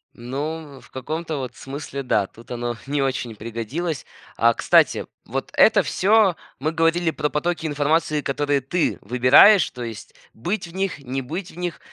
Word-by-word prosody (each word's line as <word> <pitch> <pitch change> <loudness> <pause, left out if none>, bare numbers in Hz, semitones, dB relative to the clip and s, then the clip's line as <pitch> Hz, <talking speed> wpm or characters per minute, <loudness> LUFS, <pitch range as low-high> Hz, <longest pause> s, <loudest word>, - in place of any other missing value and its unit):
Ну, 140 +4 -5
в - - -19
каком-то 155 +4 -4
вот 130 -2 -5
смысле, 140 0 -6
да, 110 -6 +1
тут 115 +4 -17
оно 120 0 -3
не 145 0 0
очень 130 -4 -2
пригодилось. 115 +9 -4 0.3
А, 115 0 +4
кстати, - - +3 0.2
вот - - -4
это - - +6
всё 205 -2 +3 0.2
мы 155 +4 -1
говорили 165 +1 +2
про 150 - -1
потоки 160 +1 -1
информации, 150 +1 +1
которые 145 0 0
ты 160 +6 0
выбираешь, 125 - +6
то 125 - -8
есть 115 -3 -8 0.2
быть 175 - -3
в 165 - -14
них, 190 0 -2
не 135 0 -4
быть 170 +8 -6
в - - -17
них. 175 -1 -3
145 Hz, 165 wpm, -22 LUFS, 125-165 Hz, 0.3 s, это